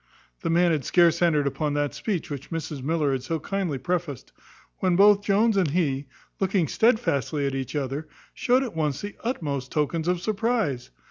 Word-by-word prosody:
The - - -2
man 170 +1 +4
had 150 -4 0
scarce 170 +1 +3
entered 155 -4 +3
upon 145 +1 -1
that 145 -1 0
speech 190 -8 -3
which 140 -1 -6
Mrs 160 -4 -4
Miller 150 0 0
had 135 -1 -1
so 160 +5 -3
kindly 180 -3 -2
prefaced, 170 -3 -3 0.5
when 185 -2 +2
both 200 +2 +6
Jones 210 +2 +3
and 180 -6 +2
he, 140 -4 0 0.3
looking 190 -4 +1
stedfastly 155 - +1
at 135 - -1
each 135 +1 -4
other, 145 +2 -3 0.3
showed 255 +2 +2
at 240 -9 -6
once 150 -4 -1
the 205 0 -6
utmost 145 - -3
tokens 160 +2 -1
of 180 0 +1
surprize. 215 - -1
165 Hz, 180 wpm, -25 LUFS, 145-195 Hz, 0.5 s, both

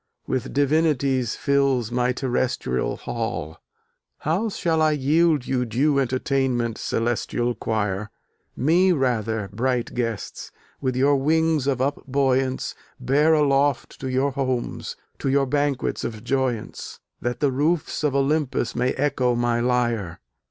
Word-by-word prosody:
With 130 -2 -2
Divinities 140 -4 +1
fills 135 -5 +1
my 125 +1 +1
Terrestrial 125 - -1
Hall! 115 -10 -4 0.6
How 185 +9 0
shall 165 -5 0
I 155 -1 +4
yield 150 0 +2
you 130 -2 0
Due 135 +5 +1
entertainment, 130 -2 0
Celestial 120 +1 -1
Quire? 105 -3 -2 0.5
Me 175 +8 +3
rather, 110 - 0
bright 125 +2 -1
guests! 115 -4 -4 0.3
with 130 -1 -1
your 140 +2 +3
wings 155 0 +2
of 135 -2 +2
upbuoyance 135 -1 0 0.3
Bear 145 +5 +3
aloft 140 -2 +1
to 130 - -4
your 130 +2 +1
homes, 130 -3 -3 0.2
to 135 - -1
your 135 0 +3
banquets 145 0 -1
of 110 -2 -5
joyance, 130 -3 -2 0.2
That 120 +1 -2
the 145 -2 +2
roofs 150 +4 0
of 145 -3 +1
Olympus 140 -3 0
may 125 +1 +1
echo 130 -3 +1
my 120 0 +1
lyre! 120 -7 0
130 Hz, 125 wpm, -23 LUFS, 120-145 Hz, 0.6 s, I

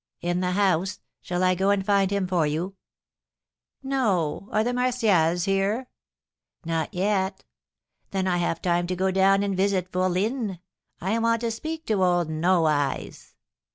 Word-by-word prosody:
"In 175 +1 -1
the 180 0 0
house. 190 -1 +1 0.2
Shall 180 +1 -2
I 185 0 +4
go 190 +2 +1
and 200 -1 +1
find 200 -2 +3
him 200 -1 0
for 175 -4 +1
you?" 170 +6 -3 1.1
"No; 205 - 0
are 215 - +2
the 245 +2 -1
Martials 215 -10 +2
here?" 200 +6 0 0.8
"Not 165 -2 -1
yet." 190 0 -1 0.7
"Then 190 -1 -1
I 180 -1 +1
have 170 -1 -1
time 175 -1 +1
to 185 - -2
go 190 +1 +1
down 195 +1 +3
and 200 -1 -1
visit 190 -1 0
fourline. 190 +3 -1 0.4
I 205 +6 -1
want 230 0 +1
to 230 -1 -1
speak 315 +7 -5
to 205 -4 +1
old 175 -3 +2
No 170 +2 +2
Eyes." 145 -3 -2
190 Hz, 155 wpm, -25 LUFS, 175-205 Hz, 1.1 s, I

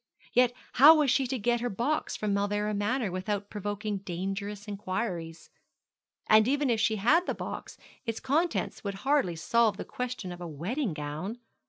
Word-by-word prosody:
Yet 245 -1 +4 0.2
how 295 +6 +9
was 295 -4 +3
she 270 -1 +2
to 260 - -2
get 240 +1 +1
her 245 - -1
box 255 +10 -1
from 210 -1 -1
Mauleverer 205 +1 0
Manor 210 +1 0
without 200 +2 -3
provoking 205 0 -3
dangerous 195 +3 -4
inquiries? 185 -5 -4 0.8
And 215 +1 +6
even 280 -1 +2
if 225 - +1
she 220 +1 +2
had 300 - +3
the - - -1
box - - -6 0.3
its 230 -4 -3
contents 320 +6 0
would 200 -1 -3
hardly 275 - +2
solve 220 +5 +2
the - - -5
question 250 -7 -4
of 175 0 -8
a 175 - -5
wedding 180 - -3
gown. 155 +9 -4
210 Hz, 170 wpm, -29 LUFS, 195-245 Hz, 0.8 s, how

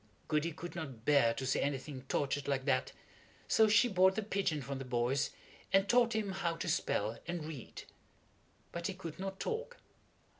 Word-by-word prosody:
Goody 155 +2 +1
could 175 +3 -7
not 135 -9 -6
bear 140 -6 +5
to 130 - -3
see 130 - +1
anything 140 -1 -2
tortured 140 +1 -1
like 135 -2 0
that, 130 -3 +1 0.6
so 220 - +5
she 210 +3 +5
bought 190 -3 +4
the 220 - -1
pigeon 195 -6 0
from 135 +1 -4
the - - -4
boys 125 +2 +1 0.4
and 195 +1 +4
taught 240 +1 +4
him 210 -3 0
how 175 -3 -1
to 165 - -4
spell 110 +3 0
and 175 -3 -3
read. 150 -7 -8 0.9
But 170 0 -3
he 195 - -4
could 170 -3 -7
not 195 0 -4
talk. 485 +2 -3
165 Hz, 180 wpm, -34 LUFS, 135-195 Hz, 0.9 s, bear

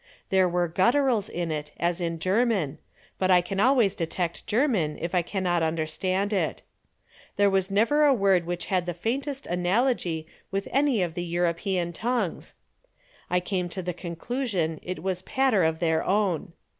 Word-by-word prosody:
There 190 -1 +4
were 175 0 +1
gutturals 230 - +2
in 170 -1 -3
it 150 -1 -4
as 175 +1 0
in 165 -1 -2
German, 185 - +1 0.4
but 185 - +1
I 180 -1 +7
can 195 +2 -4
always 235 -4 +4
detect 170 0 -3
German 210 - +1
if 170 +2 -4
I 180 - +3
cannot 175 -1 -1
understand 165 +5 -1
it. 195 - -1 0.7
There 200 0 +3
was 190 0 +1
never 230 +10 +3
a 290 - +6
word 195 -8 +3
which 175 -1 -3
had 180 -2 0
the 175 - -2
faintest 270 - -3
analogy 180 -2 0 0.2
with 195 0 -2
any 270 -7 +2
of 170 -2 -3
the 175 - -3
European 175 +1 -1
tongues. 225 -2 -2 0.7
I 180 - +2
came 180 -1 -2
to 185 +2 -5
the 180 0 -3
conclusion 175 - -3
it 185 0 -6
was 185 -1 -1
a - - -30
patter 260 -8 +2
of 160 0 +1
their 160 -1 +1
own. 195 -3 0
185 Hz, 170 wpm, -26 LUFS, 170-210 Hz, 0.7 s, I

